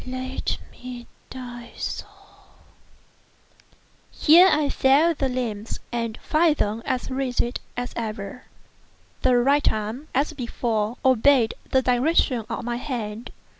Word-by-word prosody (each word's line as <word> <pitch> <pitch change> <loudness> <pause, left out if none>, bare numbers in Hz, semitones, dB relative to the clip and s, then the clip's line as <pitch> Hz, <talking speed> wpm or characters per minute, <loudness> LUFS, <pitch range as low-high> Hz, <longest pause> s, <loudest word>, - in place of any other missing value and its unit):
—let 255 +1 -3
me 250 -1 -9 0.2
die 240 -2 -8
so!" - - -4 2.2
I 320 -1 +7
here - - +1
felt 295 +5 +3
the 270 - +1
limbs 230 -4 -3
and 230 -2 -2
found 315 0 +3
them 215 -3 -1
as 255 +1 -2
rigid 255 -2 -1 0.2
as 245 0 -3
ever. 215 0 -5 0.8
The 255 -1 +4
right 280 +4 +3
arm, 220 +7 -4
as 285 +4 +1
before, 235 -3 -2
obeyed 260 -1 +4 0.2
the 260 0 +3
direction 250 -1 +2
of - - -4
my 240 0 -2
hand. 235 -4 -5
250 Hz, 120 wpm, -24 LUFS, 230-270 Hz, 2.2 s, I